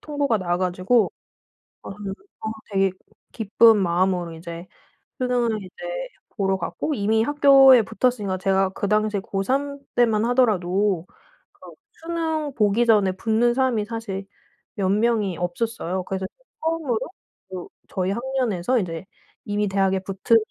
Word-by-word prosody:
통보가 285 -6 0
나와 175 -2 -1
가지고 185 +5 +2 0.7
아 - - -9
어 205 - -7 0.2
되게 195 -1 +2 0.4
기쁜 225 0 +4
마음으로 180 -1 +1
이제 170 +1 -8 0.5
수능을 240 -4 0
이제 185 - -13 0.6
보러 195 -2 0
갔고 185 - -3
이미 220 -1 +2
학교에 270 -2 +7
붙었으니까 205 -3 -1
제가 190 0 +2
그 195 +1 -3
당시에 215 -1 +1
고3 270 +10 -2 0.2
때만 225 -3 +3
하더라도 200 -6 +1 0.5
그 - - -14 0.2
수능 320 -3 -3
보기 215 +2 +2
전에 210 -5 +4
붙는 225 +5 +1
사람이 255 -5 +1
사실 210 -4 -5 0.5
몇 195 -2 0
명이 210 -3 +1
없었어요. 185 0 -2
그래서 190 +1 -4
제가 - - -36
처음으로 320 -8 0 0.5
그 185 -2 -7 0.2
저희 185 0 -1
학년에서 245 -2 0
이제 170 -3 -4 0.4
이미 205 0 -1
대학에 195 -1 +1
붙은 195 +4 +2
210 Hz, 285 characters per minute, -23 LUFS, 190-240 Hz, 0.7 s, 학교에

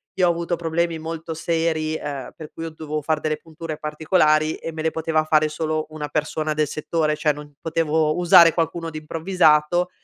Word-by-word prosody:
io 185 -2 +3
ho - - +4
avuto 170 +1 -2
problemi 165 0 -1
molto 160 0 -6
seri, 160 -1 -1
ehm, 140 -4 -5
per 155 -2 -9
cui 165 - -7
ho 165 - -5
dovevo 155 -1 -5
far 155 +1 0
delle 155 0 -1
punture 160 0 -8
particolari 155 0 +2
e 165 - -6
me 160 - -6
le 160 - +1
poteva 160 -1 0
fare 155 0 +3
solo 155 0 -2
una 155 -1 -5
persona 155 0 -2
del 150 0 +1
settore, 155 0 -1
cioè, 150 -1 +1
non 145 0 -11
potevo 160 -1 +1
usare 175 -1 +7
qualcuno 165 0 -1
di 155 - -7
improvvisato; 165 +1 +2
155 Hz, 190 wpm, -22 LUFS, 155-165 Hz, -, usare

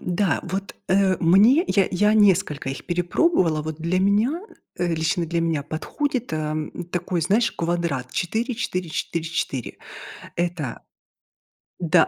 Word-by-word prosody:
да. 180 0 0
Вот, 195 +3 -4
э, 190 -1 +3
мне 215 - +5
я 195 -3 +3
я 210 +4 +3
несколько 190 -9 +3
их 135 - -7
перепробовала. 175 - +2
Вот 155 0 -5
для 170 +3 0
меня, 215 - +2 0.4
э, 175 -1 0
лично 160 +2 0
для 170 +1 -1
меня 165 -3 0
подходит, 250 - -3
эм, 155 0 -2 0.2
такой, 175 0 -1
знаешь, 205 +8 +2
квадрат 165 -7 -2
4-4-4-4. 175 - -2 0.6
Это 170 -7 -2 1.0
Да, 170 -3 +4
175 Hz, 120 wpm, -23 LUFS, 160-200 Hz, 1.0 s, мне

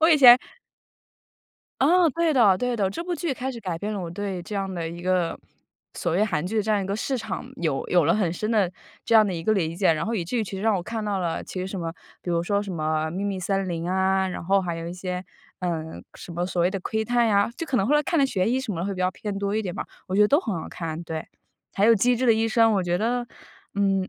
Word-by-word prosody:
我 320 - +5
以 320 - +6
前 250 -3 +9 1.4
啊， 340 +5 +5
对 335 +2 +1
的， 220 -9 +5
对 250 +4 -1
的。 200 -3 +1
这 200 - -5
部 355 0 -2
剧 335 -5 -2
开 260 +1 -3
始 245 - -7
改 180 -5 -3
变 205 +5 -4
了 205 - -3
我 170 -2 -5
对 190 -1 -4
这 205 - -7
样 195 -1 -2
的 170 -2 -3
一 170 +1 -8
个， 180 -2 0 0.6
所 170 - -2
谓 200 +5 +3
韩 155 -7 -1
剧 215 +4 -3
的 210 - +2
这 220 - -2
样 210 -1 +3
一 190 - -4
个 195 - -2
市 255 +5 -2
场， 225 -3 -5
有 155 -5 -1
有 175 -3 +4
了 - - +3
很 190 -6 +1
深 215 +5 -3
的 205 -6 +2 0.3
这 230 - +1
样 215 -1 +7
的 190 - -2
一 165 - -4
个 215 - +2
理 165 -5 0
解。 185 -2 +3
然 155 - -2
后 230 - -1
以 180 -6 -1
至 245 +9 -3
于 220 - 0
其 205 - -9
实 190 - -5
让 220 -2 +3
我 180 - -3
看 220 +3 -4
到 205 -2 -1
了 170 -3 -2
其 - - -7
实 185 - -3
什 190 0 -5
么， 165 -1 -3 0.3
比 175 - -4
如 170 -1 +1
说 200 +3 0
什 195 -2 -6
么 155 -1 -1
《秘 190 +4 -3
密 195 -2 -2
森 195 +1 -1
林》 170 -1 -3
啊， 190 0 +2
然 180 - -5
后 195 +2 +3
还 175 -2 -3
有 165 0 -5
一 - - -5
些， 180 0 -4 0.4
嗯， 160 -3 -3
什 175 - -10
么 175 +1 -2
所 175 -2 0
谓 180 - +3
的 195 - -3
《窥 220 +3 -1
探》 240 +1 +2
呀， 200 0 +3
就 330 - -4
可 275 - 0
能 195 - +2
后 290 - +3
来 295 - +4
看 340 0 0
得 275 - +5
悬 195 -5 0
疑 260 +2 +1
什 240 -6 -4
么 165 - -4
的 180 - -2
会 200 - -2
比 185 - -9
较 185 0 +2
偏 205 0 -5
多 200 0 -1
一 220 - +1
点 185 -4 -4
吧。 - - -4 0.2
我 185 - -4
觉 200 - +3
得 210 - +4
都 285 - +5
很 220 - -3
好 - - -7
看， 165 -1 -5
对。 160 -1 -5 0.5
还 200 +2 +2
有 230 - +7
《机 245 +5 +3
智 255 - -1
的 235 - +6
医 225 0 +1
生》 225 0 +4
我 195 - +2
觉 175 0 +1
得 240 +4 -1 0.5
嗯， 195 -1 +1
195 Hz, 315 characters per minute, -25 LUFS, 175-225 Hz, 1.4 s, 前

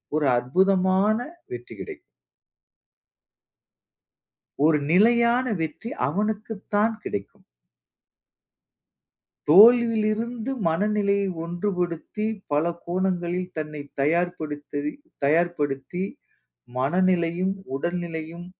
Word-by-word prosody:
ஒரு 155 -1 +1
அற்புதமான 190 - +2 0.4
வெற்றி 120 -1 -8
கிடைக்கும். - - -8 2.7
ஒரு 155 -1 +5
நிலையான 235 +5 +4 0.2
வெற்றி, 160 +8 -4 0.2
அவனுக்குத்தான் 210 +4 -1
கிடைக்கும். 100 0 -6 2.1
தோல்வியிலிருந்து 230 - +5 0.2
மனநிலையை 200 +3 +1 0.2
ஒன்றுபடுத்தி, 175 +2 -3 0.3
பல 145 +2 +2 0.2
கோணங்களில் 180 0 -1
தன்னைத் 150 -2 -6
தயார்படுத்தி- 150 -2 -1 0.3
தயார்படுத்தி, 160 +1 0 0.7
மனநிலையும், 180 +5 +1 0.2
உடல் 170 +6 -2
நிலையும். 165 +1 -6
180 Hz, 65 wpm, -25 LUFS, 155-210 Hz, 2.7 s, ஒரு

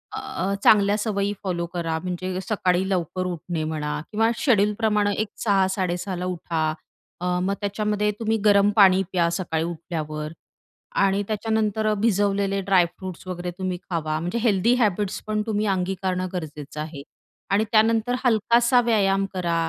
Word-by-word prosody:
अ, 255 -7 -3
चांगल्या 205 -1 +5
सवयी 205 -2 -1
फॉलो 175 -3 -2
करा. 165 -2 -1
म्हणजे 185 0 -3
सकाळी 185 -2 0
लवकर 185 0 -1
उठणे 175 -2 -3
म्हणा 150 -1 -3
किंवा 225 +1 +2
शेड्यूलप्रमाणे 210 -3 +2
एक 215 - -1 0.2
06:00-06:30 190 -2 0
ला 180 +1 -4
उठा. 170 -2 -3 0.6
अ, 180 - -4 0.2
मग 195 +2 0
त्याच्यामध्ये 210 +1 0
तुम्ही 225 -1 +1
गरम 200 -1 +5
पाणी 190 -3 +6
प्या 170 -2 +2
सकाळी 165 -3 -1
उठल्यावर. 155 -3 -5 0.6
आणि 195 0 +2
त्याच्यानंतर 215 0 0
भिजवलेले 200 -2 +1
ड्रायफ्रुट्स 185 -1 0
वगैरे 180 -1 -4
तुम्ही 185 -1 -2
खावा 155 -3 -1
म्हणजे 175 +7 -3
हेल्दी 225 0 +3
हॅबिट्स 210 -4 0
पण 215 0 0
तुम्ही 215 -1 0
अंगीकारणं 185 0 -2
गरजेचं 150 -4 -6
आहे. 155 -2 -7 0.5
आणि 200 +2 +3
त्यानंतर 225 +2 +3
हलकासा 235 +1 +4
व्यायाम 195 -4 +2
करा 175 -2 -1
195 Hz, 135 wpm, -24 LUFS, 175-210 Hz, 0.6 s, पाणी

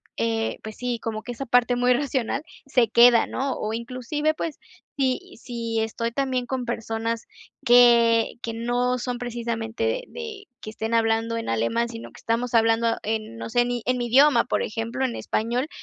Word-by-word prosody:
eh, 225 -1 -1
pues 220 -1 -8
sí, 245 -1 -2
como 220 -1 -4
que 245 - -5
esa 270 +4 -6
parte 245 0 +3
muy 245 +1 +2
racional 270 +1 -1 0.2
se 250 -4 +3
queda, 235 +1 +6
¿no?, 270 0 -2
o 215 +1 -3
inclusive, 255 +6 -2
pues 315 -1 -4 0.4
si 260 -2 -1
si 230 -2 -3
estoy 230 +1 -2
también 260 -1 -1
con 255 -1 -3
personas 225 0 -3 0.4
que 235 -2 +6
que 230 - -3
no 245 +2 0
son 245 0 -3
precisamente 230 -2 -4
de - - 0
de 445 -4 -7 0.2
que - - -7
estén 220 +1 -4
hablando 225 0 +1
en 230 - -4
alemán, 115 - 0
sino 230 -1 -8
que - - -15
estamos 235 +2 -1
hablando 230 0 +3
en, 220 +1 -3
no - - -6
sé, 240 +1 +2
ni 245 -1 -2
en 250 0 +1
mi 240 - -2
idioma, 265 0 +5
por - - 0
ejemplo, 230 +4 -3
en 240 - -2
español. 240 +6 -1
235 Hz, 180 wpm, -24 LUFS, 225-250 Hz, 0.4 s, queda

